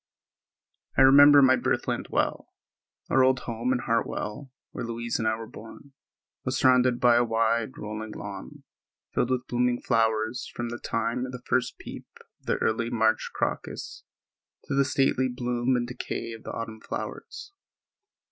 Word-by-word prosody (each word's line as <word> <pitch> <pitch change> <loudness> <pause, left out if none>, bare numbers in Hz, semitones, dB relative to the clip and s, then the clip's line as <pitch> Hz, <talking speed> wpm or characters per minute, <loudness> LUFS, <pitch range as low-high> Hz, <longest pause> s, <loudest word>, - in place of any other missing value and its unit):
I 135 - +7
remember 145 +1 +8
my 130 0 +6
birthland - - -1
well. - - -1 0.6
Our 130 - +5
old 130 -1 +3
home 115 +2 -2
in 130 - +2
Hartwell, 115 +2 -2 0.2
where - - -5
Louise 115 0 -3
and 110 - 0
I 110 - +2
were 115 0 -7
born, 115 +6 -13 0.5
was 130 0 -1
surrounded 125 -1 +4
by 120 -1 +5
a 120 - +4
wide, 115 0 0
rolling 105 0 -6
lawn, 100 -2 -8 0.5
filled 120 - +1
with 130 0 -1
blooming 125 0 0
flowers 110 +1 0
from 120 0 -3
the 120 0 -6
time 115 +3 -2
of - - -7
the 125 -1 -9
first 130 - 0
peep - - -9 0.3
of - - -28
the - - +1
early 115 +1 0
March 110 -1 +1
crocus - - -4 0.6
to - - -5
the 140 0 +3
stately 130 -1 +1
bloom 125 0 -1
and 120 -1 -1
decay 120 -1 -5
of 115 -1 -10
the - - -5
autumn 110 -1 -6
flowers. 400 - -7
120 Hz, 160 wpm, -27 LUFS, 115-130 Hz, 0.6 s, remember